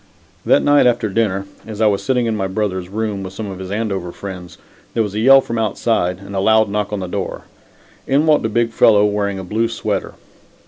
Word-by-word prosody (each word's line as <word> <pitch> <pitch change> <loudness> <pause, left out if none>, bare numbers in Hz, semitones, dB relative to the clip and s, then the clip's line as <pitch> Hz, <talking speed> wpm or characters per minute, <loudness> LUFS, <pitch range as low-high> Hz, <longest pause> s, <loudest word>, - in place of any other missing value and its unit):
That - - +4
night 145 -3 +5
after 120 -3 +1
dinner, 100 -2 0 0.2
as 110 -2 -7
I 110 - +3
was 100 -2 +2
sitting 125 -2 0
in 115 -1 -1
my 95 -2 -1
brother's 95 -2 -3
room, 105 -1 -3
with 95 -1 -7
some 110 +2 -6
of 95 - -8
his 95 -1 -7
Andover 100 -4 -3
friends, 90 -2 -9 0.4
there 115 - +2
was 105 -2 -5
a 105 - -2
yell 135 +4 +7
from 115 -3 -4
outside, 105 -4 0
and 100 +1 -10
a - - 0
loud 110 +2 +3
knock 105 0 -2
on 105 -2 -3
the 90 - -4
door. - - -4 0.6
In 140 +3 +2
walked 155 -2 +3
a 110 - 0
big 115 +1 0
fellow 105 -2 +5
wearing 100 -1 -1
a 95 - -6
blue 110 +5 0
sweater. 115 - -3
105 Hz, 225 wpm, -18 LUFS, 95-115 Hz, 0.6 s, yell